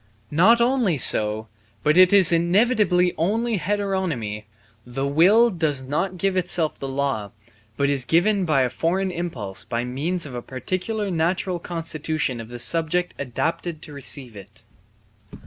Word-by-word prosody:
Not 195 +10 +5
only 235 - +2
so, 110 -3 +2 0.4
but 150 - +3
it 185 0 +7
is 195 -4 +6
inevitably 180 +1 +2
only 220 +5 0
heteronomy; 175 - -2 0.4
the 125 +3 -4
will 190 +12 +4
does 155 -7 -1
not 165 +8 -2
give 195 +2 0
itself 175 -3 0
the 135 - -5
law, 135 -6 -2 0.5
but 140 - +1
is 140 -2 +1
given 185 - +2
by 155 -6 +2
a 125 - -1
foreign 185 +7 -1
impulse 130 - -4
by 115 +1 -3
means 155 +8 -3
of 140 - -8
a 120 - -5
particular 185 - -3
natural 175 +2 -1
constitution 155 -6 -3
of 115 - -10
the 120 - -7
subject 165 +6 0
adapted 155 +5 -3
to 150 - -9
receive 135 -4 -5
it. 105 +3 -13
165 Hz, 145 wpm, -23 LUFS, 135-185 Hz, 0.5 s, it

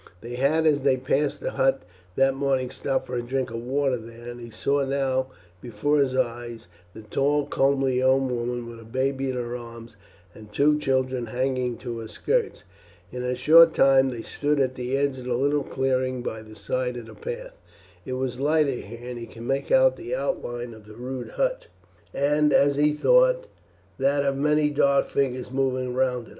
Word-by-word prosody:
They 120 +1 -7
had 140 +6 +2
as 145 -2 +3
they 135 -1 +3
passed 135 +3 0
the - - -2
hut 135 -8 +1 0.3
that 135 0 +3
morning 135 -2 0
stopped 135 -1 -2
for 125 - -5
a 120 - -1
drink 130 0 -2
of 115 0 -4
water 135 +1 0
there, 115 +1 -10
and 120 0 -10
he 120 - -9
saw 140 +5 0
now 135 -1 0 0.3
before 125 +6 0
his 130 -2 +1
eyes 120 -3 -3 0.3
the 110 - -10
tall 140 +7 +1
comely 135 -2 +1
young 130 +1 +3
woman 120 0 -3
with 115 -1 -9
a - - -12
baby 135 +3 -1
in 130 - -2
her 120 -1 -3
arms 115 -1 -10 0.4
and 105 -1 -14
two 150 +7 +3
children 130 -3 0
hanging 125 0 -1
to 120 -2 -6
her 110 - -7
skirts. 465 - -1 0.5
In 125 - -5
a 125 0 -1
short 160 +6 +7
time 135 0 +5
they 120 -3 -6
stood 145 0 -1
at 130 -1 +1
the 125 +1 -2
edge 140 -1 0
of 125 - -9
the 125 -1 -1
little 145 +3 +1
clearing 130 -2 -1
by 110 -2 -4
the 110 0 -13
side 125 +4 -2
of 120 - -7
the - - -12
path. - - -7 0.5
It 130 - -5
was 130 -1 -3
lighter 150 0 +2
here, 120 -1 -8
and 125 -1 -5
he 115 - -7
could 115 - -11
make 135 +3 -2
out - - +5
the 375 +7 -4
outline 120 - -3
of 110 -1 -15
the 105 - -12
rude 125 +1 -6
hut, - - -1 0.4
and, 150 +1 +2
as 140 0 +4
he 150 +1 +4
thought, - - +3 0.5
that 140 +1 +2
of 135 0 +1
many 150 +1 +2
dark 140 -1 +2
figures 130 -2 -1
moving 130 -2 -1
round 125 -2 0
it. - - -16
130 Hz, 200 wpm, -25 LUFS, 120-140 Hz, 0.5 s, short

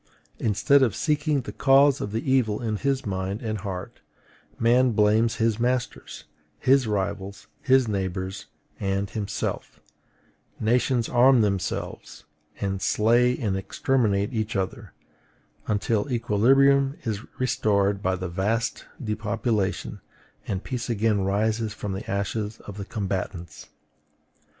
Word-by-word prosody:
Instead 115 +7 +3
of 120 -6 +2
seeking 150 -2 0
the - - -7
cause 135 0 +4
of 100 - -4
the 115 +4 -3
evil 115 -6 +2
in 110 -2 -2
his 135 +2 -1
mind 95 +1 -3
and 110 -2 -2
heart, 90 -2 -6 0.6
man 120 +1 +3
blames 110 +2 +3
his 115 -1 0
masters, 125 +1 -2 0.3
his 130 -2 +3
rivals, 100 -1 -3 0.2
his 130 -2 +4
neighbors, 95 -1 -3 0.3
and 100 0 -1
himself; 100 -2 -4 0.8
nations 120 +1 +1
arm 125 0 +5
themselves, 100 -4 -3 0.4
and 95 -1 -2
slay 120 +3 +3
and 105 -7 -1
exterminate 105 +1 0
each 110 -1 -2
other, 95 -1 -3 0.8
until 110 +4 0
equilibrium 135 +5 +3
is 110 -3 -2 0.2
restored 100 -5 +1
by 95 -1 +1
the 90 0 -4
vast 100 +7 -1
depopulation, 105 -3 -2 0.5
and 95 -1 -3
peace 125 -2 -4
again 110 -2 +1
arises 105 +3 0
from 105 - -5
the 95 +2 -6
ashes 105 +2 -2
of 100 -1 -10
the 100 - -5
combatants. 95 -5 -4
110 Hz, 120 wpm, -25 LUFS, 100-125 Hz, 0.8 s, arm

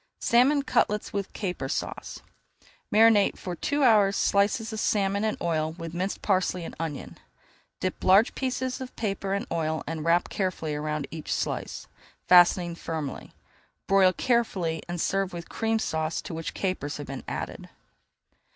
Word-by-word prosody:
SALMON 270 +4 +4
CUTLETS 210 -5 0
WITH 200 -1 -3
CAPER 180 -9 -4
SAUCE - - -4 0.7
Marinate 215 -2 +5
for 180 -2 -5
two 285 - 0
hours 210 -5 +5
slices 220 +3 +1
of 220 - -3
salmon 200 -1 +1
in 215 -1 0
oil 160 -2 -1
with 165 -1 -7
minced 185 +3 -3
parsley 185 -3 +1
and - - -7
onion. 160 -4 -5 0.6
Dip 185 - -3
large 195 +5 +5
pieces 260 0 -2
of 255 - -7
paper 195 -2 -2
in 200 - -2
oil 160 -1 -1
and 160 0 -4
wrap 170 +2 +3
carefully 180 -5 -2
around 150 0 -2
each 160 -2 -6
slice, - - -3 0.4
fastening 175 -1 +6
firmly. 160 -4 -5 0.5
Broil 195 -1 +5
carefully 185 -8 0
and 175 0 -3
serve 195 +2 0
with 170 -1 -6
a - - -23
Cream 225 0 0
Sauce 160 -6 -1
to 185 - -7
which 165 0 -5
capers 185 -7 -2
have 145 - -6
been 135 -1 -7
added. - - -5
185 Hz, 155 wpm, -27 LUFS, 165-210 Hz, 0.7 s, fastening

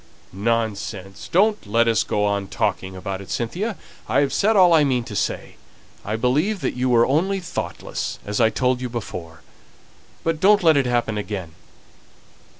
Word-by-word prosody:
"Nonsense. 100 -3 -3
Don't 205 - +2
let 115 +3 +3
us 115 -3 +3
go 105 0 0
on 100 -1 -1
talking 95 0 -2
about 95 +1 -5
it, 100 - -12
Cynthia! 185 - -2 0.3
I've 140 -1 +2
said 220 +2 +2
all 185 -3 +6
that 165 - +7
I 150 - +4
mean 130 -4 +1
to 110 -3 -8
say. - - -3 0.5
I 105 - -2
believe 150 - +1
that - - -1
you 125 +1 -1
were 120 -1 +5
only 185 +8 +1
thoughtless, 180 0 -5
as 105 +3 -1
I 110 - +5
told 125 +2 0
you 125 - -3
before. 90 -8 -7 0.8
But 165 -1 0
don't 205 +2 +5
let 160 -2 +6
it 135 -3 +2
happen 120 -3 0
again." 100 -5 -5
120 Hz, 170 wpm, -22 LUFS, 105-160 Hz, 0.8 s, that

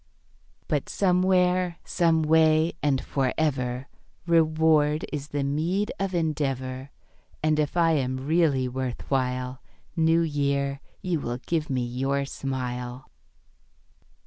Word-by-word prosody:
But - - -1
somewhere, 180 -1 +2
some 165 -2 +2
way, 160 +1 +4
and 140 -3 +2
for 135 -2 -1
ever 130 -4 -1 0.4
Reward 155 -2 +3
is 145 -1 -4
the 145 -1 -2
meed 165 +9 0
of 195 -2 -1
endeavour; 135 -5 -2 0.5
And 155 0 +2
if 150 +3 -1
I 165 -1 +4
am 130 -4 0
really 150 -5 +2
worth 130 -1 -4
while, 125 -1 -1 0.3
New 165 0 +3
Year, 140 -3 -1 0.2
you 175 -3 0
will 120 -3 -3
give 155 +4 -2
me 130 -2 0
your 135 +3 -1
smile. 125 -2 -5
145 Hz, 120 wpm, -26 LUFS, 130-165 Hz, 0.5 s, way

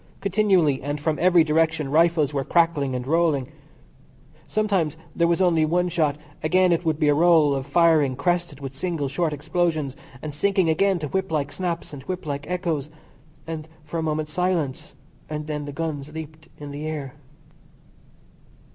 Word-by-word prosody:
Continually 190 -8 +2
and 145 +2 -3
from 155 +1 -1
every 175 -1 +5
direction 155 -2 +1
rifles 160 -2 +3
were 140 -1 0
crackling 160 -5 +2
and 125 -1 -3
rolling; 155 -3 +1 1.0
sometimes 195 -8 0 0.2
there 170 - +3
was 170 +2 +2
only 165 -3 +3
one 175 +3 +1
shot, 155 -4 +1 0.3
again 185 +3 +3
it 170 +1 +1
would 160 -3 0
be 155 - +2
a 145 - +5
roll 160 -2 +5
of 135 0 -3
firing 155 -3 +4
crested 175 -3 -1
with 135 -1 -6
single, 160 -1 -2
short 155 +4 -1
explosions, 155 -2 -1 0.2
and 150 +2 -6
sinking 190 +2 +2
again 195 +4 +2
to 155 -3 -4
whip 190 +1 -2
like 145 -2 -1
snaps 170 -3 -4
and 140 - -7
whip 185 -1 -4
like 145 +1 -4
echoes; 170 -6 -2 0.6
then 160 -2 -5 0.2
for 160 +2 -4
a - - 0
moment 155 -1 -1
silence, 160 -6 -2 0.3
and 150 0 -4
then 150 -1 -3
again 145 - -5
the - - -4
guns 150 -1 -4
leaped 160 0 -9
in 145 -1 -8
the 145 +2 -5
air. 145 -4 -5
155 Hz, 175 wpm, -24 LUFS, 145-175 Hz, 1.0 s, every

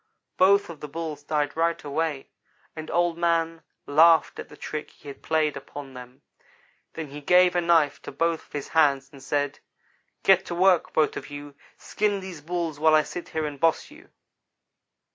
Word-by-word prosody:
"Both 200 +2 +4
of 160 - -12
the 150 - -7
Bulls 155 -1 -6
died 145 -1 -1
right 165 +1 0
away, 145 -1 -3 0.5
and 155 -1 -7
Old 175 -1 0
man 165 -1 0 0.2
laughed 160 +2 +4
at - - -8
the 150 - -14
trick 155 0 -6
he - - -18
had 140 - -11
played 155 -2 0
upon 140 0 -9
them. 125 0 -12 0.7
Then 160 -3 -6
he 145 +2 -9
gave 180 +3 +4
a 175 - +2
knife 165 -4 +2
to - - -8
both 165 +3 -1
of - - -27
his 145 -1 -5
hands, 140 -4 +2
and 140 - -14
said: 145 +1 -2 0.6
"'Get 190 -1 +5
to 175 - -4
work, 185 -1 +3
both 155 - +1
of - - -8
you! 145 0 -9 0.2
Skin 205 -1 -1
these 185 -5 -9
Bulls 165 -2 -3
while 155 0 +5
I 155 - +4
sit 175 - -8
here 160 -1 -2
and 145 -2 -6
boss 165 - +1
you.' 320 +6 -16
160 Hz, 185 wpm, -25 LUFS, 145-170 Hz, 0.7 s, Get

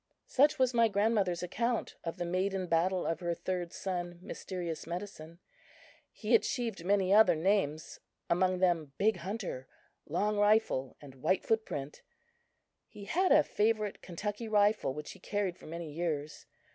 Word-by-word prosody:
Such 290 +3 +3
was 255 -1 +2
my 230 -1 +5
grandmother's 200 -4 +1
account 235 +6 -1
of 165 - -4
the 175 - -2
maiden 185 +2 -1
battle 180 +2 +1
of 165 - -1
her 175 -1 -2
third 180 -1 -3
son, 175 -2 -4
Mysterious 175 -5 -5
Medicine. 170 -2 -7 0.7
He 220 +2 -3
achieved 230 -4 +1
many 195 0 +2
other 215 -4 +7
names; 160 -3 0 0.3
among 185 +2 +2
them 170 -6 +1
Big 220 +2 +2
Hunter, 230 - -5 0.4
Long 210 0 0
Rifle 205 - +2
and 140 -2 -11
White 185 +6 +1
Footprint. 150 -11 -2 0.9
He 200 - -11
had 370 - +1
a 300 +1 +7
favorite 215 -3 0
Kentucky 205 +5 -5
rifle 210 -7 +3
which 150 0 -6
he 195 - -13
carried 200 -1 -2
for - - -13
many 165 -1 -6
years. 150 -2 -3
190 Hz, 145 wpm, -32 LUFS, 170-215 Hz, 0.9 s, other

